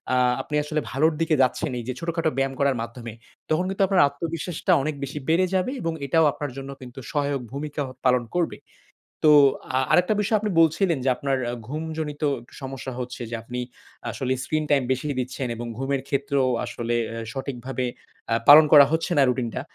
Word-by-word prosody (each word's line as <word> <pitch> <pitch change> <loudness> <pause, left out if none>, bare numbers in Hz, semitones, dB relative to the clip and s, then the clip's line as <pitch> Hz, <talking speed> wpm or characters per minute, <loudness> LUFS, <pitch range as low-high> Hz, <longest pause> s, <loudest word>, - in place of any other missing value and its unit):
আ - - +3 0.2
আপনি 150 +3 -5
আসলে 155 +1 -2
ভালোর 155 +4 +2
দিকে 160 -1 +2
যাচ্ছেন 130 +2 +1
এই 120 - -6
যে 130 - -2
ছোটখাটো 165 -1 -1
ব্যায়াম 135 0 0
করার 140 -1 +2
মাধ্যমে। 115 -1 -7 0.4
তখন 155 +4 +1
কিন্তু 195 0 0
আপনার 185 -6 +5
আত্মবিশ্বাসটা 165 +4 -3
অনেক 150 +1 -2
বেশি 140 +2 -4
বেড়ে 175 +3 +4
যাবে 185 +7 +1
এবং 165 -1 -1
এটাও 160 +4 +3
আপনার 145 -2 -5
জন্য 135 0 -7
কিন্তু 125 +1 -10
সহায়ক 145 -3 -1
ভূমিকা 145 +2 -4 0.2
পালন 125 -1 +4
করবে। 175 -2 0 0.7
তো 155 - +7 0.5
আ - - +4
আরেকটা 180 +4 +4
বিষয় 215 +1 +2
আপনি 215 0 -2
বলছিলেন 165 0 +2
যে 135 - +4
আপনার 135 0 -1 0.3
ঘুমজনিত 155 0 -4 0.4
সমস্যা 130 -1 -6
হচ্ছে 125 0 -6
যে 120 - -3
আপনি 125 +2 -5 0.5
আসলে 130 -1 -3
স্ক্রিন 155 0 -1
টাইম 140 -3 +4
বেশি 130 +2 -1
দিচ্ছেন 130 +1 -3
এবং 120 +1 -6
ঘুমের 135 +1 -1
ক্ষেত্রেও 140 -2 +1 0.2
আসলে 120 0 -3
অ্যা 115 0 -5
সঠিকভাবে 130 -1 -4 0.5
আ - - +4 0.2
পালন 150 +2 +11
করা 145 -2 +10
হচ্ছে 160 +2 0
না 140 - +6
রুটিনটা। 125 0 -2
140 Hz, 180 wpm, -24 LUFS, 130-160 Hz, 0.7 s, পালন